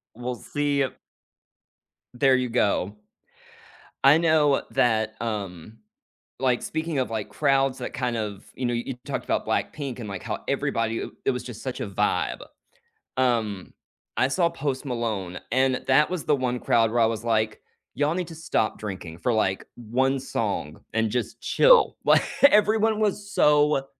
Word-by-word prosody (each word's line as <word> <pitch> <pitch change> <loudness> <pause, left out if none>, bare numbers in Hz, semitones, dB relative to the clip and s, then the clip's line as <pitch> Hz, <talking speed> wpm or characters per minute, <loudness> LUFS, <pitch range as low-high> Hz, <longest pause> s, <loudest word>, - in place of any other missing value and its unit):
We'll 125 +1 -4
see 145 +2 -1
a 130 - -3 1.2
There 130 +1 +4
you 125 -1 0
go. 105 -4 +1 1.1
I 140 +3 +7
know 155 -4 +3
that, 110 -2 +1
um 105 -3 -5 0.6
like, 125 -2 +2
speaking 160 -1 -3
of, 130 - 0
like, 110 -2 -4
crowds 135 +3 +1
that 125 - -5
kind 125 -1 -1
of 105 -3 -4
you 130 - -3
know, 120 - 0
you 120 +3 -3
talked - - -3
about - - -1
BLACKPINK 135 -5 -2
and, 110 - -6
like, 100 -2 -6
how - - -3
everybody, 115 0 -1
eh - - -4 0.2
it - - +3
was 125 -1 -3
just 120 -4 -8
such 130 -2 -4
a - - -2
vibe. 95 -3 0 0.8
Um, 115 -7 0 0.4
I 130 - +3
saw 170 +4 +2
Post 145 -4 -3
Malone, 110 -8 -3
and 130 0 +2
that 140 +3 +4
was 180 -5 -3
the 150 - +3
1 125 -2 -1
crowd 115 -1 +3
where 120 +1 +1
I - - +6
was 115 0 -3
like, 110 -2 0 0.3
"Y'all 145 +2 +1
need 180 -2 -3
to 165 - -9
stop 155 -8 -1
drinking 90 -6 -7
for, 105 +8 0
like, 95 -3 0
1 130 +4 0
song 100 - -3
and 110 -1 +1
just 125 +2 -3
chill." - - +5
Like, - - +6 0.2
everyone 220 -3 +5
was 205 -1 -1
so 150 -2 +3
125 Hz, 165 wpm, -25 LUFS, 110-145 Hz, 1.2 s, I